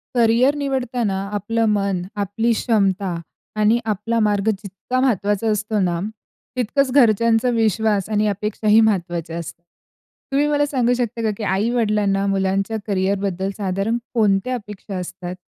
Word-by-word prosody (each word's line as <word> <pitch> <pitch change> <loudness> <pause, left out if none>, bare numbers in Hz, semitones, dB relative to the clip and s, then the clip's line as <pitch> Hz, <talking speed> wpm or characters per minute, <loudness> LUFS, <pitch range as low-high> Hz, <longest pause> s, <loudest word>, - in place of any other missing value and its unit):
Career 240 +4 +4
निवडताना 250 -7 -1 0.2
आपलं 225 +3 0
मन, 200 -3 0 0.2
आपली 205 +4 0
क्षमता 195 -5 +1 0.5
आणि 215 +3 +4
आपला 220 +2 -1
मार्ग 210 -1 +2
जितका 205 +4 -3
महत्वाचा 210 -4 +1
असतो 215 +1 -1
ना, 175 -3 0 0.6
तितकंच 255 +3 +1
घरच्यांचा 230 -2 +4
विश्वास 220 -3 +1
आणि 210 0 +1
अपेक्षाही 210 +1 +2
महत्वाच्या 175 -6 0
असतात. 170 0 -8 0.7
तुम्ही 285 +2 +2
मला 290 0 +2
सांगू 250 -4 +1
शकता 235 -1 -2
का 220 - +1
की 220 - -5
आई-वडिलांना 205 -1 +1 0.6
करियरबद्दल 195 -1 -1
साधारण 200 +3 -1 0.2
कोणत्या 215 +1 +2
अपेक्षा 210 -3 -8
असतात? 180 0 -6
210 Hz, 125 wpm, -21 LUFS, 195-230 Hz, 0.7 s, Career